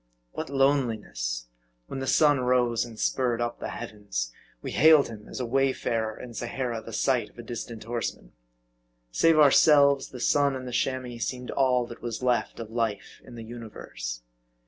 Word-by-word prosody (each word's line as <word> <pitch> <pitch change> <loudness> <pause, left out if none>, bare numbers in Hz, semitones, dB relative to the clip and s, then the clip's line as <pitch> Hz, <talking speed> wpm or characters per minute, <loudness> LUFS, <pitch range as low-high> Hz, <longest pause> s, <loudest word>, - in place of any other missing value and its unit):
What - - -5
loneliness; 115 - 0 0.4
when 135 - -6
the 135 - -4
sun 145 -2 +4
rose, 125 -2 +2
and 115 -2 -11
spurred 125 -3 0
up 120 0 -2
the - - -4
MARDI. - - -6
53 120 - -5
heavens, - - -3 0.3
we - - -4
hailed 155 0 +6
him 105 -2 -10
as - - -6
a 125 - -1
wayfarer 120 -3 0
in 120 - -9
Sahara 120 0 -3
the 115 - -10
sight 125 +2 +1
of - - -27
a 120 - -8
distant 115 -1 -6
horseman. 115 - -4 0.8
Save 165 - +4
ourselves, 140 -1 +6
the 125 - -9
sun 140 +2 +2
and 130 -1 -6
the - - -5
Chamois 125 -1 -2
seemed 125 +3 -3
all 125 -2 +2
that 120 - -11
was 120 +1 -5
left 125 -1 0
of 115 -1 -7
life 115 -3 -3
in - - -12
the 115 - -8
universe. 110 - -7
120 Hz, 180 wpm, -27 LUFS, 115-135 Hz, 0.8 s, hailed